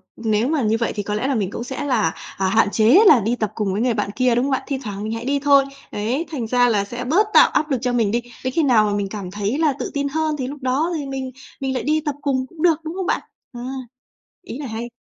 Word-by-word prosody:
nếu 220 0 0
mà 305 -1 +1
như 220 -1 +2
vậy 230 - -1
thì 205 - -2
có 210 - -3
lẽ 215 +5 -1
là 275 - 0
mình 200 -4 -1
cũng 235 - -5
sẽ 265 +3 -5
là, 250 -7 +2 0.3
à, 190 - +1
hạn 220 +2 +4
chế 225 +9 +5
là 290 - +8
đi 225 +3 0
tập 215 -4 -2
cùng 205 -4 -1
với 205 - -1
người 245 0 +2
bạn 210 -2 -2
kia, 250 0 +2
đúng 245 +2 +1
hông 280 - -1
bạn? 265 - 0
Thi 275 - -1
thoảng 205 -2 -5
mình 215 - -3
hãy 230 +1 -5
đi 280 +1 +1
thôi, 280 -1 +5 0.3
đấy, 240 +10 -2
thành 250 -7 -3
ra 245 +1 +3
là 205 -3 +2
sẽ 240 +4 -6
bớt 365 - +3
tạo - - +7
áp 305 -1 0
lực 265 - +2
cho 250 -1 0
mình 225 -4 +2
đi. 235 +2 0 0.2
Đến 255 0 -2
khi 325 - +2
nào 235 -6 +4
mà 205 - 0
mình 205 -1 -1
cảm 195 -3 -6
thấy 205 +5 -2
là 310 -3 +2
tự - - -4
tin 285 0 -1
hơn 310 +1 -1
thì 260 -3 -3
lúc 285 +1 -8
đó 270 +7 0
thì 290 - -4
mình 265 -1 -4 0.3
mình 265 -1 -1
lại 255 - -2
đi 310 +1 +1
tập 295 -2 -1
cùng 260 -2 0
cũng 315 +3 -12
được, 330 -2 +3
đúng 320 +1 -5
không 380 -1 -3
bạn? - - 0 0.3
À, 240 - -8 0.9
ý 275 - -7
này 285 -3 -5
hay. 225 +2 -5
250 Hz, 295 wpm, -21 LUFS, 220-285 Hz, 0.9 s, là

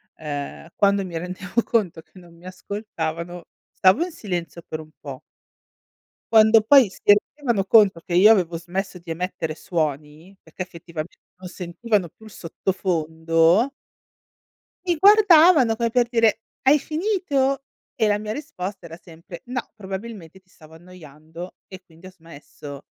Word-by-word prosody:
ehm, 150 +1 -7
quando 200 -1 +2
mi 170 -2 -8
rendevo 185 +5 -3
conto 185 -8 -1
che 185 - -23
non 175 -2 -16
mi 170 +2 -19
ascoltavano 175 -3 -6 0.3
stavo 190 - +3
in 360 - -5
silenzio 175 - -6
per 155 - -5
un 155 0 -11
po'. 135 -3 -9 1.1
Quando 220 0 +7
poi 250 -1 +6
si - - -16
rendevano 210 0 +2
conto 200 -5 +5
che 170 - -8
io 200 +5 +7
avevo 175 -5 +2
smesso 185 +3 -5
di 170 -1 -9
emettere 165 -2 -4
suoni, 155 +1 -4
perché - - -11
effettivamente 170 -2 -7 0.2
non 180 0 -10
sentivano 190 +2 -2
più 220 - -22
il 215 - -13
sottofondo 165 - 0 1.2
mi 350 -2 +1
guardavano 345 - +6
come 230 0 -1
per 245 -1 +2
dire: 230 -2 +2 0.2
"Hai 280 +3 +5
finito?" 305 -6 -1 0.3
E 220 - +1
la 205 - +2
mia 215 0 -5
risposta 200 - -7
era 165 +1 -10
sempre: 170 0 -13
"No, 250 0 -3
probabilmente 190 -3 -8
ti 185 0 -38
stavo 160 -2 -18
annoiando 165 0 -12
e 190 -1 -11
quindi 170 +1 -16
ho - - -12
smesso." 145 -4 -12
185 Hz, 145 wpm, -22 LUFS, 165-220 Hz, 1.2 s, Quando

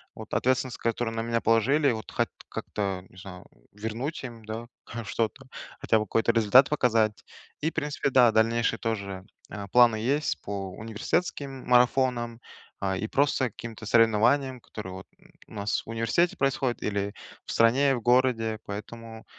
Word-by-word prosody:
вот - - -10
ответственность, 130 -1 +1
которую 115 0 -1
на 115 - -1
меня 115 0 -1
положили, 130 +6 +3
вот 110 -1 -5
хат - - 0 0.2
как-то, 95 -3 -3
не 95 - -20
знаю, 90 -2 -10
э, - - -28 0.2
вернуть 115 +9 -4
им, 115 -3 -9
да, 110 +2 -5 0.2
хоть 115 -2 -7
что-то, 115 +6 -2 0.3
хотя 110 - +2
бы 105 - -2
какой-то 115 +3 +2
результат 115 +4 +5
показать. 115 -7 +1 0.4
И, 160 - +1
в - - -16
принципе, 150 -3 -1
да, 125 -3 +6
дальнейшие 115 +1 +2
тоже, 100 -4 -4 0.3
а, 100 -2 -6
планы 120 0 +5
есть 140 +7 -1
по 100 -2 -5
университетским 130 - -3
марафонам, 125 -1 +2 0.4
а, 95 -1 -1
и 110 - -3
просто 135 -2 +1
каким-то 115 -1 -9
соревнованиям, 120 +4 +3
которые 100 -5 -8
вот 95 +1 -9 0.4
у - - -15
нас 105 0 -2
в - - -14
университете 115 +10 +1
происходят 135 -2 0
или 100 0 -2 0.3
в - - -6
стране, 135 +4 +4
в 120 - -5
городе, 120 -3 +2
поэтому 110 +2 -8
115 Hz, 160 wpm, -27 LUFS, 110-130 Hz, 0.4 s, да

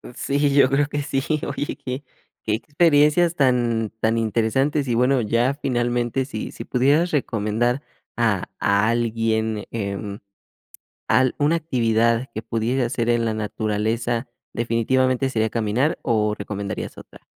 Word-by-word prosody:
Sí, 140 +1 0
yo 140 -2 +5
creo 140 +2 +2
que 145 0 -3
sí, 135 -1 -2 0.3
oye, 145 - -2
que 130 +2 -5 0.4
que 105 - -1
experiencias 150 +6 +3
tan 120 -5 +1
tan 110 +1 +1
interesantes, 125 +6 +1
y 120 - 0
bueno, 125 +2 +3
ya 115 +5 +1
finalmente, 120 0 0
si 110 -5 -6
si - - -8
pudieras 145 +7 +2
recomendar 120 -1 0 0.3
a 110 -6 +1 0.2
a 100 +2 +2
alguien, 110 -2 0
em, 100 -1 -4 0.9
al 130 -1 +3
una 150 +3 +3
actividad 115 -5 +1
que 110 - -4
pudiera 120 +3 0
hacer 120 0 -1
en 120 -1 +2
la 110 - 0
naturaleza, 110 +3 -2 0.3
¿definitivamente 130 +3 +1
sería 110 -3 0
caminar 115 +7 0
o 105 -3 +1
recomendarías 100 -1 -5
otra? - - -16
120 Hz, 135 wpm, -22 LUFS, 110-135 Hz, 0.9 s, yo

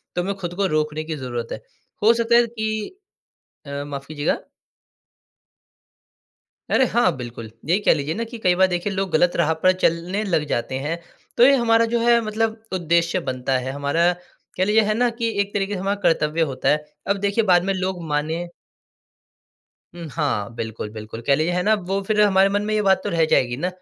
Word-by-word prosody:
तुम्हें 185 +3 -1
खुद 175 -2 -5
को 200 - 0
रोकने 155 -1 -1
की 160 0 -4
ज़रूरत 120 -4 -5
है। - - -5 0.4
हो 225 +2 +7
सकता 235 0 +2
है 240 0 +5
कि 220 - -4 0.7
अ, 140 0 -5
माफ़ 140 -1 -7
कीजिएगा। 150 0 -1 2.3
अरे! 265 - +4
हाँ, 200 - +2
बिल्कुल। 120 -3 -8
यही 170 +6 +2
कह - - +4
लीजिए 150 +1 -3
ना, 230 +2 -2
कि 235 +1 -9
कई 180 -5 +2
बार 190 +1 +4
देखिए, 180 +3 -2
लोग 190 -1 -2
गलत 175 +3 +3
राह 160 -2 +2
पर 185 - +6
चलने 175 +5 +1
लग 165 -6 0
जाते 120 +1 -2
हैं। 150 +5 -3 0.4
तो - - +4
ये 275 +2 +7
हमारा 230 -1 +3
जो 235 - +2
है, 235 0 +4
मतलब 220 0 -2
उद्देश्य 170 0 +1
बनता 130 +1 -1
है, 130 +1 -4
हमारा, 145 +5 +1 0.4
कह 185 - +2
लीजिए, 215 +3 +4
है 215 0 0
ना 245 +2 +2
कि 230 0 -2
एक 200 0 -2
तरीके 205 0 -1
से 185 - -4
हमारा 200 +1 -2
कर्तव्य 155 -1 +1
होता 130 - -2
है। 150 0 +2 0.2
अब 200 - +2
देखिए, 205 +3 +1
बाद 180 -3 +4
में 195 0 0
लोग 185 -1 -3
मानें 160 +4 -2 1.4
उम, 170 -2 -8
हाँ, 120 -9 -2
बिल्कुल, 110 -2 -5
बिल्कुल। 110 +1 -8
कह 140 - +5
लीजिए 155 +5 0
है 180 0 0
ना, 215 +2 +3
वो 195 0 -2
फिर 210 -1 +2
हमारे 195 -2 +5
मन 205 +1 0
में 215 0 -1
ये 215 - +2
बात 195 -1 +3
तो - - -2
रह 165 -1 +2
जाएगी 120 -1 +2
ना, 170 +7 -1
180 Hz, 200 wpm, -22 LUFS, 150-210 Hz, 2.3 s, हो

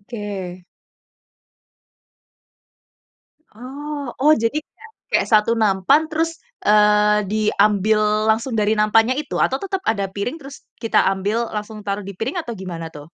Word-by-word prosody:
Oke. 200 -5 -7 2.9
Oh. 280 +4 -7
Oh, 300 +3 +6
jadi 230 +7 +1
kayak 455 +8 -18 0.2
kayak - - +2
satu 215 +1 +4
nampan 220 - +2
terus, 325 +1 -2 0.3
eee, 210 0 +4
diambil 215 0 +2 0.3
langsung 230 +3 0
dari 210 0 +2
nampannya 225 +3 +3
itu - - -6
atau 265 - +2
tetep 385 -1 -3
ada 210 -3 +1
piring 200 +9 -4
terus 275 0 -10 0.3
kita 225 - +2
ambil 205 +5 -1
langsung 210 +1 -5
taruh 200 +1 -2
di 200 +1 -8
piring 260 +10 -3
atau 240 - -6
gimana 170 -3 -6
tuh? 150 -1 -11
215 Hz, 130 wpm, -20 LUFS, 205-260 Hz, 2.9 s, Oh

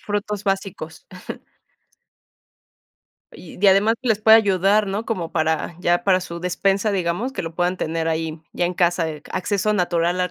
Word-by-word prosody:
frutos 205 0 -3
básicos. 195 -5 -4 2.3
Y 170 - -12
y - - -13
de 200 +2 +5
además 200 +4 +4
que 255 - -3
les 215 -2 +2
puede 220 +1 +8
ayudar, 200 0 +2
¿no? 200 +3 -3
como 180 -8 -3
para 160 0 -1
ya 175 0 +2
para 185 -2 +3
su 170 -1 -7
despensa, 195 +3 0
digamos, 190 +7 -1
que - - -4
lo 165 -1 -6
puedan 180 +2 0
tener 165 -1 -2
ahí, 160 0 -3
ya 175 - -1
en 175 - 0
casa, 175 -1 +1
de 155 -2 -5
que, - - -16
¿acceso 205 +2 0
natural 175 -1 0
a 180 -1 0
180 Hz, 180 wpm, -21 LUFS, 170-205 Hz, 2.3 s, puede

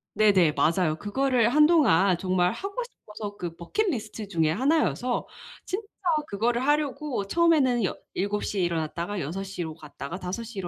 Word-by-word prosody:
네네. 195 -7 +4
맞아요. 165 -1 +1
그거를 240 +4 +1
한동안 285 - +5
정말 180 0 +1
하고 395 - -6
싶어서 210 - -9
그 170 -2 -5
bucket 395 - -1
list 220 -4 -5
중의 160 -5 +1
하나여서 255 - +1 0.4
진짜 410 +3 -4 0.4
그거를 235 +5 0
하려고 290 -6 0
처음에는 285 -5 +3
여 - - -2 0.2
7 205 +2 -1
시에 200 - -1
일어났다가 170 +3 -2
6 175 +8 -4
시로 175 -5 -5
갔다가 150 +1 -8
5 185 +5 -4
시로 230 +1 -10
205 Hz, 350 characters per minute, -26 LUFS, 175-265 Hz, 0.4 s, 한동안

